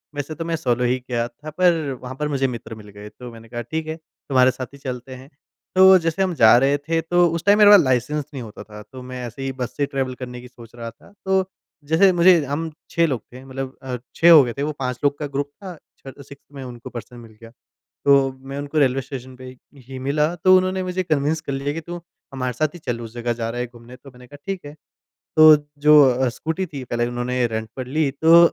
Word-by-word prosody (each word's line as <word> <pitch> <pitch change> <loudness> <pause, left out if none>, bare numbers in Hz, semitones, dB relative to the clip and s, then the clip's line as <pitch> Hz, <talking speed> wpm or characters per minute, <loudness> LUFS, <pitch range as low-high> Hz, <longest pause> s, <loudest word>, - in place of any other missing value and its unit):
वैसे 145 +2 -5
तो 165 - -5
मैं 165 0 -1
सोलो 125 -6 -1
ही 125 +1 +1
किया 120 -2 -3
था, 135 +6 -11
पर 165 -3 +1
वहाँ 130 +1 -7
पर 150 +2 -2
मुझे 135 -2 0
मित्र 120 -2 -7
मिल 105 -1 -13
गए। 105 +1 -11
तो 125 +2 -11
मैंने 115 0 -13
कहा 120 0 -5
ठीक 160 +7 -4
है, 160 - -3
तुम्हारे 130 -5 0
साथ 130 - -6
ही - - -12
चलते 130 -1 -7
हैं। 130 +2 -13 0.5
तो 190 0 +8
जैसे 165 +2 -2
हम 185 -2 -1
जा 110 -5 +7
रहे 135 +3 +3
थे 165 0 +1
तो 175 +2 +3
उस 165 0 -3
टाइम 205 +1 +5
मेरे 205 -1 +7
पास 205 -3 +9
लाइसेंस 130 +3 0
नहीं 130 -3 -6
होता 110 -2 -10
था। 105 -1 -12
तो 130 -1 -9
मैं 125 0 -7
ऐसे 120 +3 -9
ही 135 - -2
बस 125 -2 -5
से 145 - +1
ट्रेवल 135 -2 -3
करने 125 -1 -7
की 125 - -12
सोच 120 -2 -15
रहा 115 -1 -6
था। 115 - -21
तो 190 0 +2 0.4
जैसे 160 +6 +4
मुझे 175 -2 +5
हम 150 +4 -3 0.2
6 170 - +2
लोग 130 -8 -2
थे 130 +1 -11
मतलब 135 0 -6
अ, 130 -2 -5 0.2
6 170 +1 +6
हो 155 -4 +9
गए 120 -2 -3
थे। 140 - -2
वो 150 - -1
5 125 -2 -3
लोग 145 0 +2
का 150 - -3
ग्रुप 140 0 -3
था 185 -2 -6 0.2
छ 135 - -11
6th 140 0 -14
मैं 135 -1 -8
उनको 120 -2 -9
पर्सन 120 +1 -9
मिल 115 -2 -13
गया। 115 0 -12 0.5
तो 140 -1 +4 0.2
मैं 135 +1 -5
उनको 145 +2 -3
रेलवे 135 -2 +3
स्टेशन 130 -1 -9
पे 130 - -12
ही 130 0 -11 0.3
ही 135 -1 -7
मिला 150 +5 0
तो 185 +2 +5
उन्होंने 185 0 0
मुझे 185 0 -2
कन्विंस 155 -1 0
कर 150 -3 -6
लिया 135 +1 -2
कि 165 - -4
तू 175 +2 -7 0.4
हमारे 130 -2 -3
साथ 155 +5 -1
ही - - -9
चल 120 -7 -4
उस 115 -1 -9
जगह 120 0 -2
जा 115 -1 -4
रहा 120 +1 -4
है, 125 - -2
घूमने 120 +1 -14
तो 135 - -15
मैंने 125 0 -16
कहा 145 - -13
ठीक 195 -4 -4
है। 145 - -9 0.6
तो 155 -1 +9 0.2
जो 150 +1 +7
अ, 130 +1 +1
स्कूटी 160 +9 -3
थी 145 -5 -8
पहले 120 0 -1
उन्होंने 120 +1 -1
रेंट 110 -1 -4
पर 130 -1 -5
ली। 145 +2 0
तो 165 +4 +6
135 Hz, 250 wpm, -21 LUFS, 125-155 Hz, 0.6 s, पास